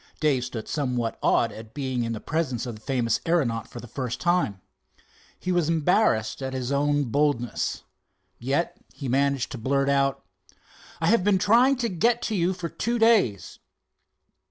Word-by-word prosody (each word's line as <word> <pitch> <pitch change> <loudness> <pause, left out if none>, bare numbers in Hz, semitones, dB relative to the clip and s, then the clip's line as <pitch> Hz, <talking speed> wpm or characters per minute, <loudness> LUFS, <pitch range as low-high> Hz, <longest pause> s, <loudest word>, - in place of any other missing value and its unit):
Dave 140 -5 +2
stood 120 -3 -6
somewhat 125 -6 -2
awed 115 - +2
at 110 +2 -11
being 130 -4 -2
in 115 - -2
the 110 - -4
presence 145 -6 -2
of 120 - -5
the 105 - -12
famous 120 -2 0
aeronaut 125 -10 +1
for 120 - -9
the 120 - -10
first 125 0 -4
time. 175 - +1 0.8
He 185 - -2
was 175 -3 +1
embarrassed 160 - +2
at 130 0 -4
his 130 0 -3
own 145 +1 +2
boldness. 145 -5 0 0.6
Yet 135 +7 -1 0.2
he 140 - -7
managed 135 0 +1
to 130 - -6
blurt 140 +4 +1
out: 135 0 +1 0.7
"I 160 - -1
have 200 +2 +4
been 200 -1 +3
trying 235 +8 +4
to 245 -2 -1
get 235 +6 +1
to 220 - -1
you 180 -1 +2
for 180 -2 -5
two 235 +8 -2
days." 220 - +2
140 Hz, 170 wpm, -25 LUFS, 120-175 Hz, 0.8 s, have